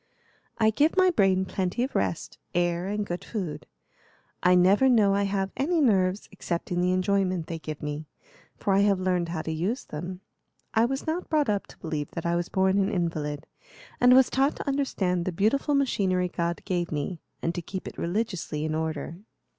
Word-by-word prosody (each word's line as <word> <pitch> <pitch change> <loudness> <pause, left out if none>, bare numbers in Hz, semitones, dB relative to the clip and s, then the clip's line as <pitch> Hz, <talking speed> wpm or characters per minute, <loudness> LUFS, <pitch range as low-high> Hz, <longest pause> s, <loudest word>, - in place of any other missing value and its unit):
"I 220 -1 +4
give 300 - +2
my 370 -1 +5
brain 190 - +3
plenty 190 +5 -1
of 265 - -3
rest, - - -2 0.2
air, 175 +1 +1
and 205 +1 -2
good 175 -2 -4
food. 185 -9 -5 0.7
I 180 0 +5
never 195 +9 +5
know 210 -5 +4
I 200 0 +2
have 195 -1 -1
any 325 +5 +1
nerves, 195 -7 +2
except 175 -3 -4
in 175 0 +1
the 180 0 +2
enjoyment 185 -2 +1
they 165 -1 -5
give 155 -1 -7
me, 150 +1 -4 0.5
for 200 - 0
I 195 - +4
have 200 -2 +3
learned 180 -2 0
how 160 -2 -3
to 160 - -3
use 185 - -2
them. 180 +5 -6 0.5
I 225 +1 +4
was 270 +2 -3
not 330 +3 -2
brought 300 -5 +2
up 205 -1 0
to - - -15
believe 155 -4 -4
that 165 - -5
I 170 0 +1
was 175 0 -1
born 190 +1 +2
an 195 0 +2
invalid, 155 -6 -2 0.5
and 250 +1 +7
was 260 -1 +5
taught 270 +2 +2
to - - -7
understand 200 -11 0
the 185 - -2
beautiful 225 - +1
machinery 190 -9 +1
God 170 -1 -2
gave 175 -2 -1
me, 155 +3 -3 0.2
and 165 - 0
to 175 - -4
keep 190 +2 -6
it - - -8
religiously 175 -5 -2
in 155 - -2
order." 160 0 -3
185 Hz, 195 wpm, -27 LUFS, 170-215 Hz, 0.7 s, and